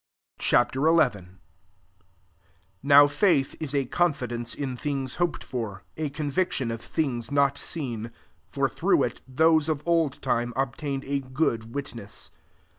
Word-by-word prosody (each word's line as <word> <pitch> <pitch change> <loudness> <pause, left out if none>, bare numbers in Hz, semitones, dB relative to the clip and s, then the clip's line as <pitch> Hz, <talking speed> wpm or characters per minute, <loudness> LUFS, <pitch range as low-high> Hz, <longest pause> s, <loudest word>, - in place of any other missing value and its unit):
Ch - - +2 0.2
XI. 130 - -3
1 125 - +2 1.4
NOW 145 +1 +8
faith 145 -1 +2
is 150 -3 -3
a 140 -1 +1
confidence 125 -7 -1
in 135 -3 -3
things 135 -1 -3
hoped 175 -2 0
for, 105 -6 -5
a 155 -2 -2
conviction 145 -3 -1
of 115 0 -5
things 125 -8 -2
not 140 -1 +3
seen. 125 -8 -3
2 115 - -10 0.4
For - - +1
through - - +2
it, - - -3
those 160 +3 +3
of 150 -2 -1
old 165 -5 +2
time 120 +1 -1
obtained 135 +1 -2
a 140 0 -1
good 130 -4 -2
witness. 115 -7 -6
140 Hz, 140 wpm, -26 LUFS, 120-150 Hz, 1.4 s, NOW